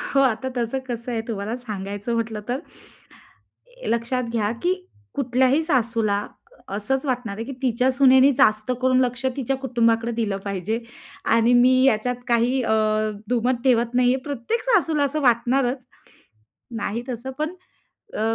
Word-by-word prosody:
हो, - - +6
आता 260 -1 +1
तसं 240 +2 -1
कसं 240 +1 -4
आहे, 225 - -1
तुम्हाला 220 0 -3
सांगायचं 205 -2 -5
म्हटलं 225 -2 -2
तर 255 +3 -1 1.3
लक्षात 235 +2 0
घ्या 215 -3 0
की 360 +1 +2 0.4
कुठल्याही 260 +3 +2
सासूला 230 -8 0 0.4
असंच 235 +8 -1
वाटणार 245 -6 -2
आहे, 225 - -4
की 275 - -6
तिच्या 250 +1 +2
सुनेने 265 0 +6
जास्त 215 -2 +3
करून 255 0 +4
लक्ष 250 0 -1
तिच्या 270 0 -1
कुटुंबाकडे 235 -3 +1
दिलं 220 -4 -1
पाहिजे 200 +3 -2 0.6
आणि 230 +1 +4
मी 250 +1 +6
याच्यात 250 0 +2
काही 240 +2 +2
अ, 220 - 0 0.6
दुमत 245 0 0
ठेवत 240 -2 +2
नाही 250 0 +4
आहे. 260 - -4
प्रत्येक 290 - -3
सासूला 330 -11 +2
असं 305 +2 -1
वाटणारच, 250 +1 +1 0.9
नाही 225 +1 -3
तसं 250 +1 -5
पण 310 +4 -2 0.6
अ, - - -3
245 Hz, 145 wpm, -23 LUFS, 230-265 Hz, 1.3 s, हो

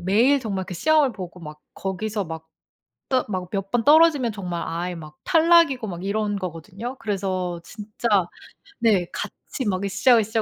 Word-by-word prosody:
매일 230 +10 +3
정말 195 -5 -3
그 185 - -6
시험을 300 - +3
보고 180 -3 -8
막 150 -1 -10
거기서 200 +2 -3
막 160 -1 -7 0.6
떠 255 -1 +2
막 185 -3 -4
몇 195 -1 -3
번 240 -2 +1
떨어지면 295 -6 +5
정말 180 -4 -4
아예 175 +2 -3
막 155 -2 -11
탈락이고 330 -8 +4
막 175 -1 -6
이런 205 0 -1
거거든요. 195 +8 -6
그래서 185 -4 -2
진짜 215 +4 -5 0.7
네. 205 -6 +3
같이 265 - -5
막 185 -1 -1
으쌰으쌰 225 +1 +3
205 Hz, 300 characters per minute, -23 LUFS, 180-245 Hz, 0.7 s, 떨어지면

